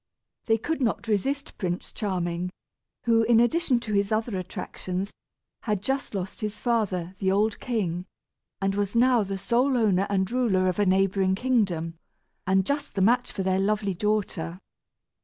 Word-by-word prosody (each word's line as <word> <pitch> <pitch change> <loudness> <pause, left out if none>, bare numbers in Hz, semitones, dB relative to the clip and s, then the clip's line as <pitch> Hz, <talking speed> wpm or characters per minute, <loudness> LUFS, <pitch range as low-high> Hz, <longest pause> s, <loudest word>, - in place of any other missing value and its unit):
They 225 -1 +3
could 295 +7 -3
not 235 -1 0
resist 270 +7 -1
Prince 175 -2 -3
Charming, 180 -3 -2 0.5
who, 230 -1 +4
in 225 0 +4
addition 260 +1 +3
to 220 -2 -4
his 200 0 +1
other 220 0 0
attractions, 185 +1 -5 0.5
had 210 -4 -1
just 265 -2 -2
lost 190 -1 -4
his 210 -1 -3
father, 205 -7 0
the 190 -1 +2
old 210 +2 +1
king, 185 -7 -2 0.5
and 195 0 0
was 205 +1 -1
now 245 0 +5
the 195 -1 -3
sole 250 +6 +2
owner 200 -4 +2
and 190 0 0
ruler 220 -7 +2
of 185 +1 0
a 205 - +3
neighboring 190 0 +3
kingdom, 190 -9 0 0.5
and 190 0 +3
just 285 -2 -2
the 195 - +1
match 245 +5 +3
for 195 - -3
their 190 0 +1
lovely 200 0 +1
daughter. 180 -4 -1
205 Hz, 160 wpm, -26 LUFS, 185-235 Hz, 0.5 s, now